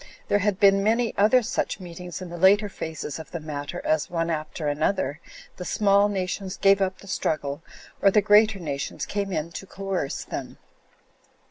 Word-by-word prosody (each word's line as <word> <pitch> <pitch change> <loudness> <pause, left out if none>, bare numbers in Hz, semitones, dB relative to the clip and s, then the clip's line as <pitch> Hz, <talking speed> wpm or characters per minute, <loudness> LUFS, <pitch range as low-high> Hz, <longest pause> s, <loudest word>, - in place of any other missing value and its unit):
There 205 - +3
had 205 -1 0
been 195 0 +5
many 225 +3 +1
other 230 +5 +4
such 230 -2 -2
meetings 180 0 -8
in 180 - -8
the 175 - -6
later 200 +3 +5
phases 160 -4 -5
of 160 - -9
the 170 - -5
matter 145 -2 -6
as, 155 -1 +1
one 165 -1 -1
after 155 0 -3
another, 145 0 0 0.4
the 180 - -5
smaller 200 +2 +3
nations 190 0 -3
gave 195 0 +4
up 190 -1 0
the 195 - -15
struggle, 150 -5 -2 0.4
or 200 - +6
the 210 - +4
greater 210 +1 +5
nations 145 -6 -4
came 200 -1 -3
in 165 -1 -2
to 195 - -8
coerce 195 -8 -3
them. - - -6
190 Hz, 175 wpm, -25 LUFS, 160-200 Hz, 0.4 s, or